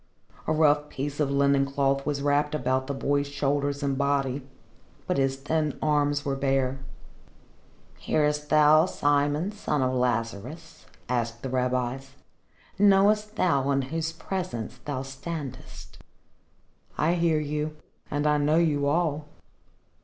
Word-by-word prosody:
A - - +1
rough 150 -1 +3
piece 145 +2 -5
of 145 -2 +1
linen 140 0 +3
cloth 140 0 0
was 140 -1 -1
wrapped 145 +1 +1
about 130 -1 0
the 140 - -2
boy's 140 +1 0
shoulders 140 0 -1
and 140 -1 -1
body, 140 -1 0 0.6
but - - 0
his 135 0 +1
thin 150 +2 -1
arms 145 -1 +1
were 140 -1 0
bare. 135 -1 0 1.2
"Hearest 150 -1 0
thou, 155 +2 +6
Simon, 145 +4 +1
son 150 -9 -1
of 130 0 0
Lazarus?" 125 +5 -3 0.2
asked 115 -2 -2
the 135 - -3
rabbis. 130 +1 -2 0.6
"Knowest 205 +2 +4
thou 140 -9 +1
in 135 -1 +1
whose 165 0 -1
presence 165 - -5
thou 135 -3 -3
standest?" 135 0 -8 1.0
"I 165 +3 +2
hear 170 -3 +2
you 150 +1 -3 0.3
and 145 +1 -1
I 150 0 +3
know 150 +2 +2
you 150 -4 +2
all." 155 -1 0
145 Hz, 130 wpm, -26 LUFS, 135-155 Hz, 1.2 s, thou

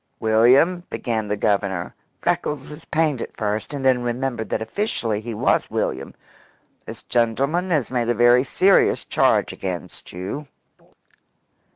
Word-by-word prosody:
"William," 125 +11 +4
began 110 -3 -2
the 105 0 -1
Governor 100 -4 -1 0.3
Freckles 145 -3 -1
was 150 +2 -11
pained 155 -6 0
at - - -7
first, 105 +2 -2
and 140 -2 -4
then 130 -2 +4
remembered 120 -1 -3
that - - -1
officially 110 - -2
he 115 0 -6
was - - +1
William 65 +1 -3 0.7
"this - - -9
gentleman 140 +10 0
has 150 -9 0
made 120 -2 0
a 120 - +2
very 120 +2 +5
serious 190 +8 +3
charge - - +2
against 90 -4 -6
you." 95 +12 -6
120 Hz, 140 wpm, -22 LUFS, 110-140 Hz, 0.7 s, very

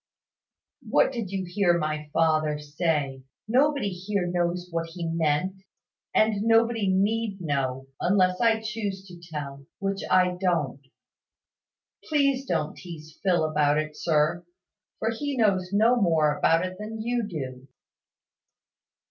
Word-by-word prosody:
"What - - +4
did 230 -7 -4
you 190 -1 -3
hear 175 -1 +2
my 155 -1 -3
father 155 -2 +2
say? 150 -2 -1 0.3
Nobody 270 -1 +2
here 190 +1 -2
knows 175 0 -1
what 165 0 -2
he 170 +1 -6
meant? 165 +3 0 0.5
And 215 -2 +2
nobody 225 -2 +3
need 205 +2 +1
know, 135 -5 -2
unless 185 -1 +2
I 225 -1 +3
choose 205 -3 -4
to 175 -2 -12
tell 140 -2 -6
which 195 0 -2
I 180 -1 +3
don't. 150 -8 0 1.2
Please 275 -3 +1
don't 160 -3 -1
teaze 160 -3 -11
Phil 175 -4 +2
about 150 -1 +2
it, 155 0 -2
sir: 160 +2 +1 0.5
for 225 - -1
he 280 +4 -3
knows 195 -5 +2
no 225 +4 +4
more 155 -5 +3
about 165 +4 +3
it 185 +1 -7
than 220 +1 -6
you 235 -1 -1
do." 130 -7 -6
180 Hz, 130 wpm, -26 LUFS, 155-210 Hz, 1.2 s, What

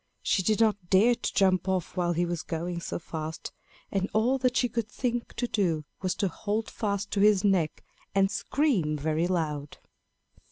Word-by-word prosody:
She 195 - +2
did 215 +3 +1
not 205 -5 +1
dare 210 +6 +5
to 240 - -3
jump 190 -1 +3
off 185 -3 -1
while 175 -1 +1
he 175 +1 +1
was 170 -1 -2
going 170 +1 -3
so - - -3
fast, 160 -1 -6 0.4
and 195 0 0
all 245 +5 +2
that 255 -1 +1
she 250 - +3
could 230 -2 -3
think 240 -1 -3
to 245 - -1
do 170 -9 0 0.2
was 185 -2 0
to 200 - 0
hold 210 +5 -3
fast 200 -2 -2
to 200 - 0
his 205 -1 +5
neck 185 -6 +1 0.3
and 195 0 +3
scream 200 - +1
very 155 +3 0
loud. 150 -5 -2
195 Hz, 185 wpm, -28 LUFS, 170-215 Hz, 0.4 s, dare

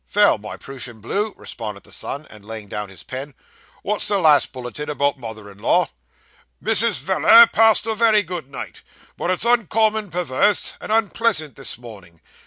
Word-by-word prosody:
'Vell, 205 - +4
my 105 +1 -8
Prooshan 125 -4 -8
Blue,' 205 - -2
responded 105 -4 -8
the - - -14
son, 145 +2 -4 0.2
laying 110 0 -9
down 105 0 -5
his 95 - -12
pen. 135 +2 -7 0.5
'What's 210 0 0
the 205 - +1
last 155 -6 +4
bulletin 130 +3 -7
about 140 -1 0
mother 110 -3 -8
in 100 - -18
law?' - - +2 0.7
'Mrs. 220 - +4
Veller 335 - +7
passed 225 -8 +4
a 225 - -1
very 220 -1 +3
good 175 -6 -7
night, 140 - -8 0.3
but - - -3
is 185 +4 0
uncommon 220 -2 +1
perwerse, 175 +3 +1
and - - -6
unpleasant 220 -7 0
this 135 - -2
mornin'. 100 -9 -13
155 Hz, 165 wpm, -21 LUFS, -, 0.7 s, Veller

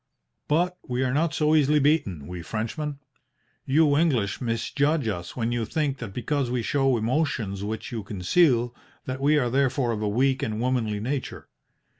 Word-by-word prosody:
"But 180 +4 +1
we 125 +1 -1
are 125 -1 0
not 160 +3 +1
so 155 -1 +2
easily 150 -1 +4
beaten, 135 - +1
we 90 +1 -6
Frenchmen. 130 - -4 0.7
You 145 +1 +4
English 130 - +1
misjudge 140 +4 0
us 90 -5 -4
when 115 -1 -1
you 120 -1 -1
think 140 +3 -1
that 115 -5 -6
because 130 +4 -1
we 120 -1 -1
show 135 0 +2
emotions 110 -5 -1
which 110 +3 -4
you 115 -2 -3
conceal, 120 - +2 0.3
that 130 +1 -4
we 150 +2 +4
are 125 -4 +1
therefore 130 -2 +1
of 110 -2 -3
a 105 - 0
weak 130 +5 +1
and 110 0 -2
womanly 115 -4 0
nature. 130 +5 -4
125 Hz, 170 wpm, -25 LUFS, 110-145 Hz, 0.7 s, easily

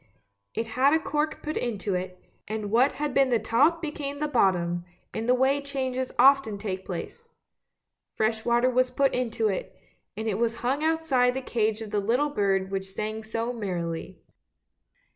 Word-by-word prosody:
It 225 - -1
had 260 +6 +3
a - - +3
cork 305 -1 -2
put 305 0 -3
into 210 -4 -2
it, 180 0 -4 0.3
and 215 -1 -4
what 250 +5 +4
had 295 -1 -3
been 270 -1 +4
the 240 - +3
top 290 - +2
became 290 -2 -4
the 300 +1 -1
bottom, 175 -9 +2 0.3
in 225 +1 -3
the 250 - +5
way 270 +2 +2
changes 260 -2 -3
often 265 -4 +5
take 190 -2 -4
place; 465 - -7 0.8
fresh 220 0 0
water 240 +2 +3
was 255 +1 +2
put 270 +2 +1
into 230 -3 0
it, 195 - -4 0.4
and 220 +1 -3
it 210 -1 -1
was 235 0 +1
hung 275 +5 +1
outside 310 -6 +2
the 265 - -2
cage 220 -2 0
of 215 - -9
the 210 - +1
little 245 +9 +1
bird 195 -6 0
which 195 0 -3
sang 215 +3 -4
so 230 +2 -2
merrily. 175 -7 -4
235 Hz, 175 wpm, -27 LUFS, 210-275 Hz, 0.8 s, the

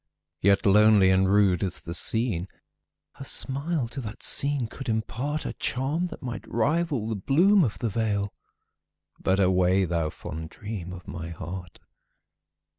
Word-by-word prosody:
Yet 100 +1 +3
lonely 105 -1 +6
and 95 0 +3
rude 100 -4 +4
as 95 - -2
the 85 - -6
scene, 100 -1 0 0.7
Her - - -7
smile 140 +1 -2
to 135 +3 -5
that 110 -2 -8
scene 140 -3 +2
could 135 +4 -8
impartA 125 +7 -2
charm 145 +7 -1
that - - -10
might 120 -2 -5
rival 145 0 0
the 110 - -2
bloom 170 - +4
of 115 -7 -1
the 120 - -1
vale,—But 100 -2 -4
away, 95 0 +3
thou 85 -2 -1
fond 80 +1 -7
dream 100 -4 -7
of 90 -1 -10
my 85 -1 -6
heart! 90 +1 -7
105 Hz, 140 wpm, -26 LUFS, 95-135 Hz, 0.7 s, lonely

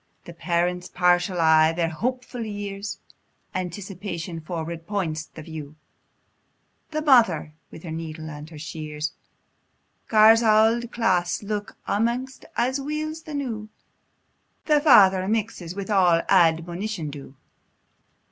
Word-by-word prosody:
The 170 - -9
parents, 180 +1 -1
partial, 180 0 +2
eye 160 0 +5
their 165 0 0
hopeful 250 +6 -3
years; 205 -1 -5 0.6
Anticipation 180 -2 -5
forward 165 0 -6
points 165 -6 -2
the 155 - -11
view; 155 -2 -8 1.1
The 310 0 -3
mother, 225 - +4 0.2
wi' - - -11
her 165 - -6
needle 160 -1 -6
and 150 0 -8
her 160 - -11
shears, 155 0 -5 0.9
Gars 220 +1 +6
auld 225 +2 +3
claes 185 -6 0
look 205 0 -4
amaist 240 +5 -1
as 260 +4 +1
weel's 310 +2 -4
the 310 -2 -8
new; 225 -7 -4 1.0
The 300 -2 +3
father 195 -10 +6
mixes 205 -5 -2
a' 200 - -3
wi' 180 -5 +3
admonition 170 0 +1
due. 140 -1 -10
185 Hz, 120 wpm, -24 LUFS, 165-225 Hz, 1.1 s, Gars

